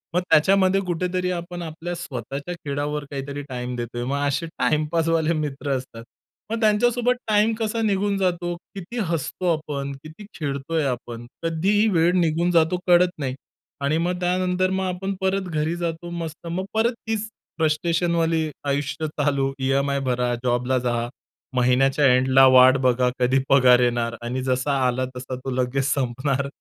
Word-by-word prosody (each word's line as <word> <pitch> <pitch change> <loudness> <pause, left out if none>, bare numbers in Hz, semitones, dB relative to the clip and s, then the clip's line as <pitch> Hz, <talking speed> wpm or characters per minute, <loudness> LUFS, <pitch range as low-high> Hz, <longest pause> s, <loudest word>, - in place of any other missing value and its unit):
मग 180 - +3
त्याच्यामध्ये 190 +4 +4
कुठेतरी 180 +1 -1
आपण 175 0 -5
आपल्या 170 +1 -5
स्वतःच्या 140 0 -5
खेळावर 145 -1 -3
काहीतरी 140 +1 -5
टाईम 125 -1 -4
देतोय. 120 0 -4
मग 140 +3 -1
असे 140 +4 -1
टाईमपासवाले 160 +1 0
मित्र 145 -2 -3
असतात. 115 -3 -9 0.5
मग 230 +1 -2
त्यांच्यासोबत 240 +3 +3
टाईम 215 +1 +3
कसा 225 +1 -1
निघून 200 -1 +1
जातो, 175 -2 -1 0.2
किती 195 +5 -7
हसतो 170 +2 -1
आपण, 145 -3 -5
किती 160 +7 -11
खेळतोय 145 +2 -2
आपण. 120 -2 -4 0.2
कधी 165 +3 0
ही 220 - +4
वेळ 170 -3 +3
निघून 170 +1 +1
जातो 170 +1 +3
कळत 175 0 +5
नाही. 130 -3 -2 0.5
आणि 140 +3 +1
मग 175 +2 -1
त्यानंतर 180 +1 +1
मग 190 0 -1
आपण 185 +2 -3
परत 190 0 0
घरी 155 +2 -1
जातो 170 0 -4
मस्त. 170 -1 -6
मग 180 +3 -3
परत 230 +2 +2
तीच 220 -1 -1 0.3
फ्रस्ट्रेशनवाली 165 0 +1 0.2
आयुष्य 145 +3 -1
चालू 140 -2 0
ई-एम-आय 140 +1 +1
भरा, 125 0 0
जॉबला 125 +1 +1
जा. 120 -1 -1 0.5
महिन्याच्या 130 +3 +3
एंडला 130 +1 +5
वाट 130 +1 +7
बघा 125 0 +2
कधी 130 +2 +3
पगार 125 -2 +6
येणार 120 -1 0
आणि 125 +2 -3
जसा 130 +2 0
आला 130 +1 0
तसा 130 +1 -5
तो 130 +1 -6
लगेच 130 +1 0
संपणार 135 +1 -1
155 Hz, 150 wpm, -23 LUFS, 130-175 Hz, 0.5 s, वाट